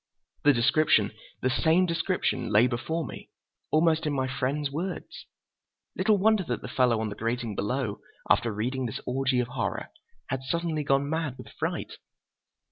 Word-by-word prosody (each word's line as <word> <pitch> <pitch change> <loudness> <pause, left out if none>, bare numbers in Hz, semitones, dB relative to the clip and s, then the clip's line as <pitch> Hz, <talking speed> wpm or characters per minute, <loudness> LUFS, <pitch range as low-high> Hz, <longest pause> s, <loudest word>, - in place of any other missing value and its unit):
The 145 - +7
description—the 120 -3 +2
same 165 +6 +3
description—lay 165 - +2
before 125 +7 -1
me, - - -9 0.4
almost 160 0 +3
in 150 - 0
my 130 -1 0
friend's 140 +2 -1
words. 180 - -5 0.7
Little 215 -2 +3
wonder 215 0 +3
that - - -3
the - - -5
fellow 125 -3 +2
on 110 - -1
the 100 - -6
grating 115 -1 -2
below, 105 +1 -2 0.3
after 115 0 +3
reading 125 +5 -2
this 110 - -5
orgy 130 0 +1
of 125 -1 -1
horror, - - -3 0.4
had 135 0 -2
suddenly 155 +3 -1
gone 140 0 +2
mad 155 -4 -2
with - - -10
fright. - - -4
135 Hz, 150 wpm, -28 LUFS, 120-160 Hz, 0.7 s, The